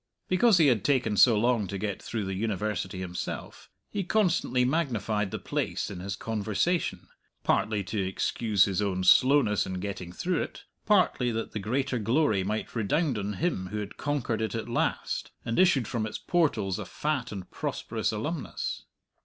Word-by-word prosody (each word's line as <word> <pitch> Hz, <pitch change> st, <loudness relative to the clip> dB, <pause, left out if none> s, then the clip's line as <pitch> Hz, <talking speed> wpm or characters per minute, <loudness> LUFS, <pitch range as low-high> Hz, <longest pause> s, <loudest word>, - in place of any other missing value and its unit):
Because 190 Hz, +2 st, +5 dB
he 165 Hz, -, +5 dB
had 120 Hz, -7 st, +3 dB
taken 125 Hz, -7 st, +2 dB
so 115 Hz, +1 st, +6 dB
long 115 Hz, -2 st, +2 dB
to 100 Hz, -, -4 dB
get 100 Hz, -1 st, -3 dB
through 110 Hz, -3 st, -3 dB
the 95 Hz, -, -3 dB
University 100 Hz, -2 st, -2 dB
himself, 90 Hz, -1 st, -6 dB, 0.2 s
he 200 Hz, -, -1 dB
constantly 170 Hz, -, +2 dB
magnified 115 Hz, -8 st, 0 dB
the -, -, -4 dB
place -, -, -2 dB
in 95 Hz, -, -6 dB
his 95 Hz, +2 st, -4 dB
conversation, 110 Hz, -, -1 dB, 0.4 s
partly 105 Hz, -2 st, +1 dB
to 100 Hz, +2 st, -2 dB
excuse 95 Hz, +2 st, +2 dB
his 95 Hz, 0 st, -1 dB
own 95 Hz, -2 st, -1 dB
slowness 130 Hz, +1 st, +5 dB
in 95 Hz, -, -4 dB
getting 90 Hz, -2 st, -5 dB
through 175 Hz, -, -1 dB
it, -, -, -6 dB, 0.2 s
partly 185 Hz, -, +3 dB
that 115 Hz, 0 st, -3 dB
the 110 Hz, -, -3 dB
greater 125 Hz, +5 st, -1 dB
glory 115 Hz, -2 st, +2 dB
might 105 Hz, +5 st, -3 dB
redound 140 Hz, -, +1 dB
on 105 Hz, +1 st, -3 dB
him 150 Hz, -, -1 dB
who 105 Hz, -, -5 dB
had 105 Hz, -1 st, -5 dB
conquered 140 Hz, -6 st, -1 dB
it 110 Hz, +1 st, -2 dB
at 115 Hz, -, -3 dB
last, 120 Hz, -, -1 dB, 0.2 s
and 115 Hz, -, 0 dB
issued 160 Hz, -, +4 dB
from 110 Hz, -2 st, -2 dB
its 105 Hz, -, -5 dB
portals 115 Hz, -, 0 dB
a -, -, -4 dB
fat 145 Hz, -5 st, -2 dB
and 95 Hz, -3 st, -7 dB
prosperous 110 Hz, -1 st, -2 dB
alumnus. 135 Hz, +8 st, -4 dB
110 Hz, 170 wpm, -28 LUFS, 100-140 Hz, 0.4 s, so